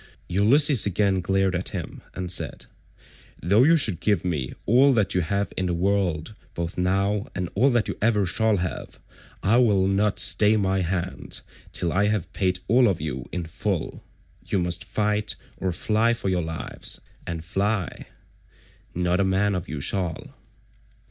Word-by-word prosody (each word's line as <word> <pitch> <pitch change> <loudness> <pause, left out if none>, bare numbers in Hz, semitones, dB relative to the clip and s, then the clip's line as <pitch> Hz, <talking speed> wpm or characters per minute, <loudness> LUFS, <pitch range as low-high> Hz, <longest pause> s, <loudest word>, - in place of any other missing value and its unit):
Ulysses 120 - +4
again 100 -1 +1
glared 95 +1 +1
at 90 +1 -3
him - - -7
and 90 -1 -4
said, 90 - -1 0.7
"Though 100 +6 +3
you 165 +4 +5
should 105 - +1
give 100 -3 +1
me 75 -8 -2
all 130 +5 +5
that 105 -5 +1
you 90 - +2
have 100 +4 -2
in 95 - -1
the 90 - -1
world 95 -1 0 0.2
both 85 0 -4
now 100 +3 0
and 90 -2 -2
all 125 +8 +4
that 120 -5 +1
you - - -3
ever 105 -2 +2
shall 110 +3 +1
have, 90 -1 -5 0.4
I 110 +5 +4
will 105 -6 +4
not 100 +1 +1
stay 105 +1 +4
my 95 -2 +1
hand 90 +1 -3 0.3
till 85 - 0
I 100 +2 +2
have 105 -5 -2
paid 95 -2 +1
all 120 +3 +5
of 95 -5 0
you 70 -4 -4
in 90 -2 -3
full. 80 - -3 0.4
You - - 0
must 90 -1 -2
fight, 105 0 0 0.2
or 95 - -1
fly 110 +6 +1
for 100 - -3
your 90 -1 +1
lives; 80 -4 -5 0.3
and 85 -1 -5
fly, 100 +1 -2 0.9
not 90 +1 +1
a - - +3
man 95 +2 +1
of 90 -1 -4
you 75 - -4
shall." 90 -1 -2
95 Hz, 170 wpm, -24 LUFS, 90-105 Hz, 0.9 s, you